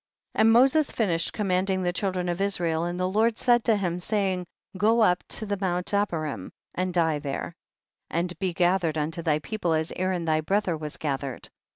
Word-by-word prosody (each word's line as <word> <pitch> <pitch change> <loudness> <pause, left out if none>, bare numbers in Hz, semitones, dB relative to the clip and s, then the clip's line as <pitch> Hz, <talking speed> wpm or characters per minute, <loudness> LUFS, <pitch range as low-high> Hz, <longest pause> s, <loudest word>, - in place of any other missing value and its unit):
9. - - +1
And 225 +1 +6
Moses 270 +6 +5
finished 170 -7 0
command 190 -2 0
ing 190 -1 0
the 175 0 0
children 185 -1 -1
of 175 +2 -2
Israel, 170 -5 0
and 175 +1 -3
the 185 - +1
Lord 220 +4 +2
said 240 -2 +3
to 225 - +4
him, 180 -3 -1
saying, 190 -2 -1 0.3
go 220 +5 +3
up 180 -4 +3
to 220 - -3
the 205 -1 -2
mount 180 0 -1
Abarim 155 - -1 0.2
and 185 0 -1
die 165 -4 +2
there, 145 +4 -4 0.6
and 175 +1 -1
be 190 -2 0
gathered 175 -2 +1
unto 155 +2 -2
thy 155 -3 +2
people 175 +1 -2
as 160 0 -1
Aaron 185 -2 -1
thy 155 -1 +2
brother 190 +1 0
was 150 -1 -6
gathered. 140 -3 -4
180 Hz, 195 wpm, -26 LUFS, 165-200 Hz, 0.6 s, And